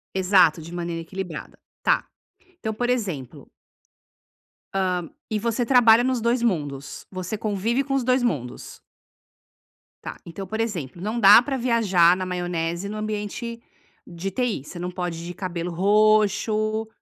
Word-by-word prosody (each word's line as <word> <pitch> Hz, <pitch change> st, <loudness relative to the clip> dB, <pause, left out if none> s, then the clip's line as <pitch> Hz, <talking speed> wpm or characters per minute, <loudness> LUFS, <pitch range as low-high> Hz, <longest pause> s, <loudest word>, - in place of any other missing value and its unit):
Exato, 185 Hz, -4 st, +4 dB
de 165 Hz, +2 st, -10 dB
maneira 170 Hz, -1 st, -3 dB
equilibrada. 175 Hz, -1 st, -7 dB, 0.2 s
Tá, -, -, +2 dB, 0.5 s
então 220 Hz, -9 st, -3 dB
por 245 Hz, +3 st, -2 dB
exemplo 185 Hz, -, -3 dB, 1.3 s
hã, 190 Hz, -1 st, +1 dB, 0.4 s
e 215 Hz, -, 0 dB
você 235 Hz, +2 st, -1 dB
trabalha 235 Hz, -2 st, +6 dB
nos 255 Hz, -1 st, 0 dB
2 235 Hz, +2 st, +1 dB
mundos? 145 Hz, -, -2 dB
Você 185 Hz, +2 st, -4 dB
convive 220 Hz, +5 st, -1 dB
com 275 Hz, -, -5 dB
os 270 Hz, -, +1 dB
2 255 Hz, +1 st, +2 dB
mundos? 145 Hz, -, -3 dB, 1.2 s
Tá, -, -, -6 dB
então, 170 Hz, +3 st, -7 dB
por 220 Hz, +1 st, -3 dB
exemplo, 175 Hz, -, -3 dB
não 215 Hz, +5 st, -2 dB
dá 205 Hz, +1 st, +9 dB
pra 270 Hz, +2 st, -3 dB
viajar 200 Hz, -8 st, +4 dB
na 185 Hz, 0 st, -3 dB
maionese 175 Hz, 0 st, -2 dB
no 210 Hz, -, -5 dB
ambiente 215 Hz, +2 st, -4 dB, 0.4 s
de 175 Hz, +3 st, -6 dB
TI, 235 Hz, -, -1 dB
você 175 Hz, -, -11 dB
não 180 Hz, -, -3 dB
pode 175 Hz, -2 st, -4 dB
ir -, -, -7 dB
de 175 Hz, -, -5 dB
cabelo 175 Hz, -1 st, -4 dB
roxo 215 Hz, +3 st, +2 dB
200 Hz, 150 wpm, -24 LUFS, 175-230 Hz, 1.3 s, dá